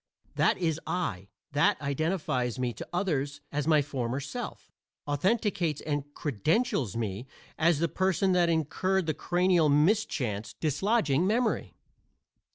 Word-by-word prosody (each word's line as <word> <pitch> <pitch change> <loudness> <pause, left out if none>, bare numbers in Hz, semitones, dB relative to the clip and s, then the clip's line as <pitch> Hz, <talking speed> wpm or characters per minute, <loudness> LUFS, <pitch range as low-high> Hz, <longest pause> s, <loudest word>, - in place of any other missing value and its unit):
That - - +2
is 165 -3 0
I; 100 - -2 0.2
that 145 +3 +3
identifies 140 - -1
me 125 -2 -1
to - - -8
others 150 -6 -1
as 145 0 -2
my 155 -2 +4
former 130 -2 -3
self 190 - -6 0.3
authenticates 175 - 0
and 145 -1 -3
credentials 145 - 0
me 110 +2 -3 0.3
as 170 0 +3
the 170 +3 +1
person 190 +2 +1
that 175 -2 +3
incurred 170 +4 +1
the 155 - 0
cranial 175 -2 +2
mischance, 145 - +1
dislodging 160 - +1
memory. 230 +2 0
155 Hz, 125 wpm, -29 LUFS, 140-180 Hz, 0.3 s, my